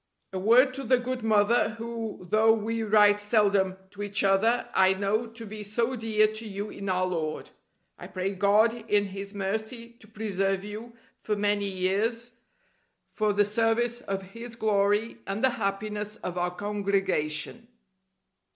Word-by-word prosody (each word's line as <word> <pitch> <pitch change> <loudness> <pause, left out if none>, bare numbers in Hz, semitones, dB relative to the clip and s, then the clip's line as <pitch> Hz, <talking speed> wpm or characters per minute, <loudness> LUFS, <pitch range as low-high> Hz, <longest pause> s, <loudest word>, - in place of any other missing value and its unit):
A 190 - -2
word 245 +7 +5
to 270 +1 -6
the 255 +1 +3
good 250 0 -4
mother, 220 +1 +3
who, 230 -4 -6
though 220 +4 +4
we 225 +1 -2
write 205 -1 +4
seldom 200 -3 +2
to 205 - -9
each 205 0 0
other, 200 +5 +2
I 190 0 +4
know 205 +4 0
to 225 0 -8
be 215 0 -8
so 230 +5 -1
dear 220 -2 +2
to 215 +1 -3
you 205 +1 -5
in 195 0 -6
Our 185 0 +1
Lord. 160 -4 -3 0.5
I - - -8
pray 190 +1 -3
God 220 +4 +2
in 205 -1 +3
His 200 +1 -7
mercy 220 +4 -3
to 220 - -16
preserve 195 -3 -1
you 215 +3 -8 0.2
for 210 - -2
many 205 0 0
years 220 +6 -1 0.7
for 215 -1 0
the 205 0 +3
service 230 +3 +1
of 195 -3 -4
His 230 +5 -9
glory 210 0 +1
and 195 +4 -3
the 260 - +4
happiness 210 0 -3
of 180 -5 -6
our 180 0 0
Congregation. 195 -1 -2
210 Hz, 160 wpm, -27 LUFS, 195-225 Hz, 0.7 s, word